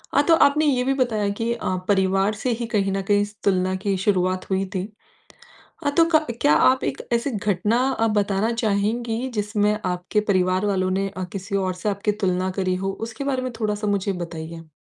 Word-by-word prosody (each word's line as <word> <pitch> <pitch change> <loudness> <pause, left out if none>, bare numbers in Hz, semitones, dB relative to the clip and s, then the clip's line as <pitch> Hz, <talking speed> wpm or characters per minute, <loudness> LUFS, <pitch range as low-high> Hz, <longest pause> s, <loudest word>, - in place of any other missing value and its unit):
हाँ 285 - +5
तो 330 - +6
आपने 300 +2 +2
ये 255 -4 +2
भी 270 +1 +1
बताया 220 -6 0
कि 225 +3 -2
अ, 205 -5 -2
परिवार 195 +1 +2
से 250 - +1
ही - - -1
कहीं 195 -2 +2
न 195 0 -1
कहीं 205 +1 +2
इस 205 +1 -4
तुलना 185 -1 +1
की 195 -1 +2
शुरुआत 185 -1 0
हुई 190 0 0
थी। 185 +2 -2 1.0
हाँ, 285 - +1
तो 330 - +7
क 310 - +4 0.2
क्या 150 - +5
आप 260 +11 +4
एक - - -2
ऐसी 235 +4 0
घटना 210 +1 0
अ, 225 -3 +1
बताना 205 +1 +1
चाहेंगी, 225 +4 0
जिसमें 210 -2 0
आपके 180 +3 -1
परिवार 185 +1 +2
वालों 185 -2 +1
ने 195 +1 0
अ, 185 -1 -6
किसी 200 +1 -4
और 185 -1 0
से 180 +4 -3
आपकी 200 +1 0
तुलना 185 -3 -1
करी 185 -1 +1
हो? 195 +1 -2
उसके 225 +4 -5
बारे 265 -2 -1
में 255 -1 -3
थोड़ा-सा 210 -1 -1
मुझे 200 -1 0
बताइए? 165 -1 -8
205 Hz, 200 wpm, -23 LUFS, 190-225 Hz, 1.0 s, तो